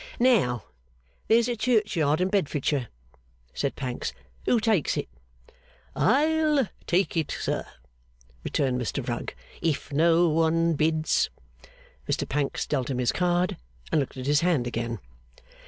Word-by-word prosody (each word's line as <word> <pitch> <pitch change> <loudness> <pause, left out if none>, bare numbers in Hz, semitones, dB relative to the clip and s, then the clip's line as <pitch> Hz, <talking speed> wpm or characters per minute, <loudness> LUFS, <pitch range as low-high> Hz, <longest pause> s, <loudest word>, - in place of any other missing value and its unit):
'Now, 175 - +3 0.6
there's 230 +1 +4
a 240 - -1
churchyard 200 - +1
in 185 - +2
Bedfordshire,' 145 - 0 0.7
said 140 - -2
Pancks. 125 -3 -4 0.3
'Who 240 - +4
takes 215 -7 +1
it?' - - -2 0.9
'I'll 305 -2 +3 0.2
take 180 +2 +1
it, 160 -3 0
sir,' - - -2 0.8
returned 130 -3 0
Mr 120 - -3
Rugg, - - -3 0.3
'if 160 -3 -1
no 165 +3 +4
one 165 +1 +2
bids.' 155 +1 +1 0.8
Mr - - 0
Pancks 145 -2 -1
dealt 135 -4 -1
him 130 - -1
his 125 -1 +2
card, 180 0 +1 0.3
and 155 - +3
looked 135 - -5
at 130 - -5
his 145 +1 +3
hand 170 -8 +2
again. 115 -1 -3
160 Hz, 130 wpm, -26 LUFS, 140-200 Hz, 0.9 s, there's